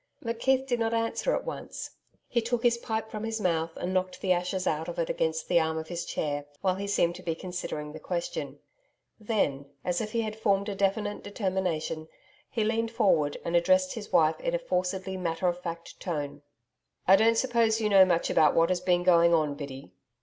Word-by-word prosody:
McKeith 260 +3 +1
did 245 -3 -1
not 225 0 +1
answer 230 - 0
at - - -3
once. - - -6 0.4
He 235 - +1
took 235 +1 -1
his 235 -1 +3
pipe 220 -1 -3
from 215 0 -5
his 225 0 -2
mouth, 165 -4 0
and 180 +1 -3
knocked 185 0 -1
the 190 - 0
ashes 180 +1 0
out 160 +1 0
of 175 - -6
it 165 - 0
against 160 0 -1
the 175 - +4
arm 160 0 0
of 160 0 -5
his 175 -1 -3
chair, 145 -1 -2 0.2
while 185 -1 +2
he 200 +2 -4
seemed 175 -4 +2
to - - -10
be 165 -3 -2
considering 160 -4 -5
the 155 - -8
question. - - -4 0.6
Then, 175 -11 -1 0.2
as 175 -1 0
if 215 -1 -5
he 230 - +1
had 215 -1 -3
formed 200 -1 +1
a - - -2
definite 200 +1 0
determination, 185 -6 -2 0.4
he 225 - -1
leaned 225 +1 0
forward 195 -11 +2
and 170 - -1
addressed 275 +10 +3
his 220 -4 -7
wife 155 0 +4
in - - -1
a - - +3
forcedly 190 - -2
matter 175 0 -1
of 175 0 -1
fact 170 -1 -7
tone. 145 -5 -4 0.7
'I 190 - +9
don't 225 +2 +4
suppose 230 -3 +2
you 215 - +1
know 195 -2 +7
much 175 -2 +1
about 155 -2 +4
what 165 0 +4
has 180 -1 0
been 180 -1 +2
going 170 -1 +5
on, 155 -3 +1
Biddy. 140 -1 -8
185 Hz, 210 wpm, -28 LUFS, 165-225 Hz, 0.7 s, I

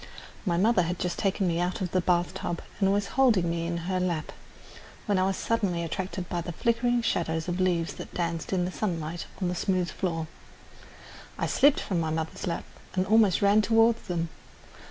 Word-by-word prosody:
My 170 -1 +2
mother 215 +1 +4
had 175 +1 -1
just 180 0 -2
taken 195 -1 +1
me 170 -1 0
out 180 +5 -1
of 185 -4 -3
the 185 - +2
bath 175 -1 +1
tub 170 -1 -4 0.2
and 195 -1 +3
was 200 0 0
holding 235 -10 +3
me 170 0 -2
in 170 0 -2
her 185 0 0
lap, 175 -4 -1 0.7
when 205 -3 +2
I 185 - +3
was 195 - -1
suddenly 195 -7 0
attracted 185 +2 -4
by 175 - -2
the 175 - -5
flickering 235 +5 +1
shadows 165 -6 0
of 175 +1 -2
leaves 175 -3 +1
that - - -9
danced 170 -2 -2
in 180 -2 +1
the 180 - -3
sunlight 170 -5 -3
on 185 - 0
the 175 - -1
smooth 180 0 0
floor. 165 -4 -2 1.1
I - - 0
slipped 285 +1 +4
from 185 -5 -1
my 160 -1 0
mother's 160 +3 -3
lap 170 - -2 0.3
and 185 0 +2
almost 210 -2 +4
ran 200 +2 +5
toward 225 +1 +4
them. 170 -3 -2
180 Hz, 195 wpm, -28 LUFS, 170-200 Hz, 1.1 s, ran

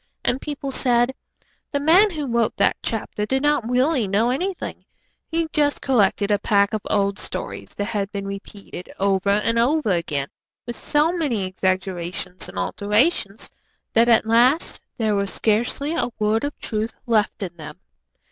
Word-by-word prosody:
And 255 - +1
people 285 -2 -4
said, 245 -1 +3 0.6
'The 285 - 0
man 345 +9 +6
who 305 -6 -4
wrote 235 -3 0
that - - +3
chapter 215 -1 -3
did 265 +6 0
not 295 -6 +1
really 255 -1 +2
know 215 +5 +2
anything; 360 +7 -3 0.4
he 330 0 -1
just 290 -1 +2
collected 210 -5 +2
a 205 - +3
pack 200 0 +2
of 215 - -1
old 200 -1 +1
stories - - -5
that 205 - -2
had 205 -2 -2
been 200 -1 -4
repeated 195 -2 -8
over 195 0 +1
and 210 +3 +2
over 265 -1 +2
again 150 -6 -1 0.4
with 240 - -5
so 300 +3 +2
many 290 - -1
exaggerations 185 -1 -2
and - - -10
alterations 210 - 0 0.4
that 230 +1 +4
at 230 -1 +5
last 245 +8 +3 0.2
there 220 -3 +1
was 200 -1 +1
scarcely 240 +7 0
a 290 - 0
word 215 +1 +1
of 290 - -5
truth 220 +1 -3
left 215 -3 +1
in 175 -2 -5
them.' 150 -1 -9
225 Hz, 160 wpm, -22 LUFS, 200-270 Hz, 0.6 s, man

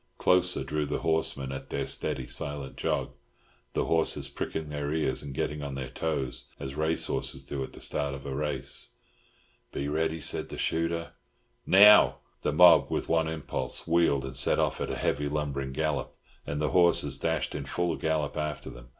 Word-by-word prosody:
Closer 90 -5 +2
drew 75 +2 -2
the - - -2
horsemen 80 -5 0
at 70 - -7
their - - -2
steady, 65 - -1
silent 70 +1 -4
jog, - - -1 0.6
the - - 0
horses 80 -1 0
pricking 80 -1 -4
their 75 -1 -3
ears 75 -4 0
and 70 - -7
getting 75 +3 -2
on 70 -2 -5
their 65 -1 -5
toes 70 -3 -2
as 65 0 -5
race 80 +2 0
horses 65 - -2
do 70 0 -4
at - - -8
the - - -11
start 70 -2 -1
of 70 - -10
a 70 - -4
race. 75 +2 -3 0.8
"Be 70 - -3
ready," 80 +2 0
said - - 0
the - - -7
shooter. 85 0 -1 0.6
"Now!" 105 +2 +8 0.3
The - - 0
mob, 90 +3 +7
with - - -2
one 80 -1 +2
impulse, 80 -2 -4
wheeled, 85 -5 +2
and 65 0 -7
set 70 - +3
off - - 0
at - - -2
a - - -2
heavy 75 +1 0
lumbering 70 -2 -2
gallop, 75 +1 -2 0.3
and 70 +1 -2
the 75 - 0
horses 85 -6 +4
dashed 80 0 -1
in 70 -2 -4
full 85 +3 -1
gallop 80 -2 -1
after 75 -2 -3
them. - - -13
75 Hz, 185 wpm, -28 LUFS, 70-80 Hz, 0.8 s, Now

